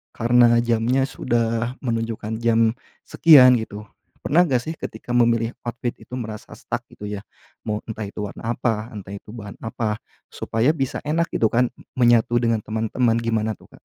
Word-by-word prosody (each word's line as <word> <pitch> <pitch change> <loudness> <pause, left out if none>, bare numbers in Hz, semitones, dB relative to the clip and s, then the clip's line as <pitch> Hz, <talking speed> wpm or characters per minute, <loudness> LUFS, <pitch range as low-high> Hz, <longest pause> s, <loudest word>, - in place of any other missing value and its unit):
karena 120 0 +5
jamnya 120 +3 +1
sudah 115 -1 -1
menunjukkan 115 -2 -3
jam 115 -1 +4 0.4
sekian, 130 -6 +7
gitu. 105 -1 -7 0.4
Pernah 170 +6 +4
enggak, 130 -5 +1
sih, 160 +1 -5
ketika 120 - -7
memilih 115 -1 +2
outfit 120 0 -3
itu - - -24
merasa 110 -2 -7
stuck, - - -4
gitu, 105 - -8
ya? 105 -1 -5 0.5
Mau 105 0 -1
entah 110 -1 -5
itu 105 - -9
warna 110 +3 -4
apa, 115 -2 -1
entah 100 -1 -8
itu 105 - -11
bahan 105 -3 -8
apa, 110 -1 -2 0.3
supaya 115 +7 +1
bisa 135 -3 -2
enak, 170 +3 0
gitu, 110 - +3
kan, 125 +1 +2 0.3
menyatu 120 -1 +4
dengan 115 -2 +1
teman-teman. 115 +2 0
Gimana, 110 -2 0
tuh, - - -20
Kak? - - -17
115 Hz, 165 wpm, -22 LUFS, 110-120 Hz, 0.5 s, sekian